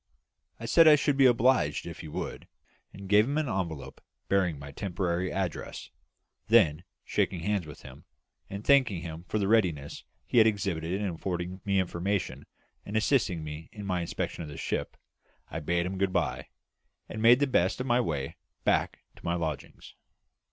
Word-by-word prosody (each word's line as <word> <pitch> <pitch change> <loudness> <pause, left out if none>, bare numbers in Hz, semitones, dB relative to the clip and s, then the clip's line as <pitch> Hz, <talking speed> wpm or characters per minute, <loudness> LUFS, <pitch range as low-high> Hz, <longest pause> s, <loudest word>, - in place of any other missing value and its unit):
I 115 - -6
said 165 +7 +6
I 155 - +9
should 145 -1 +1
be 135 -1 +6
obliged 120 - +3
if - - -8
he - - -7
would, 75 - -6 0.4
and 100 0 -10
gave 105 +2 +5
him 140 +4 -1
an 155 -2 0
envelope 85 - -4 0.3
bearing 90 -5 +2
my 70 0 -9
temporary 90 +1 -2
address; 95 -4 -4 0.6
then, 90 -8 +4 0.2
shaking 90 -3 0
hands 100 -2 -1
with 75 - -11
him, - - -12 0.4
and 100 +2 -7
thanking 120 -11 +4
him 85 0 -7
for - - -1
the 100 -2 0
readiness 90 -10 +1 0.2
he 120 - +3
had 110 - +7
exhibited 95 -4 -1
in 105 - -1
affording 90 +1 -4
me 100 -1 +2
information 95 +2 -2 0.4
and 105 +2 -3
assisting 110 - +1
me 75 +1 -7
in 105 -1 -8
my 90 -2 -1
inspection 85 - -4
of 80 - -6
the 70 - -8
ship, - - -3 0.5
I - - -3
bade 85 +3 0
him 95 +1 -4
good 95 -1 +1
bye, - - -1 0.6
and 110 - -6
made 120 +3 +7
the 145 - +3
best 95 -8 +1
of 125 - -2
my 120 -1 +3
way 70 - -3 0.3
back - - +1
to - - -17
my 85 0 0
lodgings. 80 -4 -5
95 Hz, 180 wpm, -29 LUFS, 85-110 Hz, 0.6 s, I